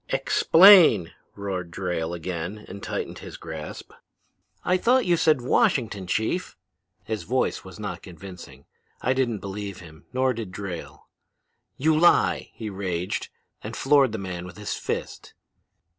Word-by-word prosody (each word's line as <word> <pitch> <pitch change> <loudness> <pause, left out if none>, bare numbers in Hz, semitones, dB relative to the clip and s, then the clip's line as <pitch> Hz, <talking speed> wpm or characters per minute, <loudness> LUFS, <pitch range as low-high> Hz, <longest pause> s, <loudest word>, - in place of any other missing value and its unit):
"'Explain!' 165 - +6 0.2
roared 95 -3 -4
Drayle, 85 -1 -3
and 90 +4 -6
tightened - - -4
his - - -9
grasp. 80 -2 -8 0.7
"'I 180 - +3
thought 245 +6 +3
you 175 - +3
said 155 -6 +2
Washington, 110 -6 +1
Chief.' 110 - -1 0.5
His 110 -2 -3
voice 125 +10 -1
was 95 +1 -12
not 95 -5 -5
convincing. 85 -6 -11 0.4
I 130 - +2
didn't 120 -6 -1
believe 100 -1 -6
him, 80 -4 -14
nor 130 0 +1
did 110 -5 -6
Drayle. 90 -3 -7 0.7
"'You 155 +3 +3
lie!' 175 +3 +3
he 110 - -6
raged, 95 -3 -3 0.3
and - - -7
floored 135 -3 +4
the 110 - -3
man 90 -3 -5
with 90 - -12
his 105 -1 -4
fist. - - -5
100 Hz, 135 wpm, -25 LUFS, 90-130 Hz, 0.7 s, Explain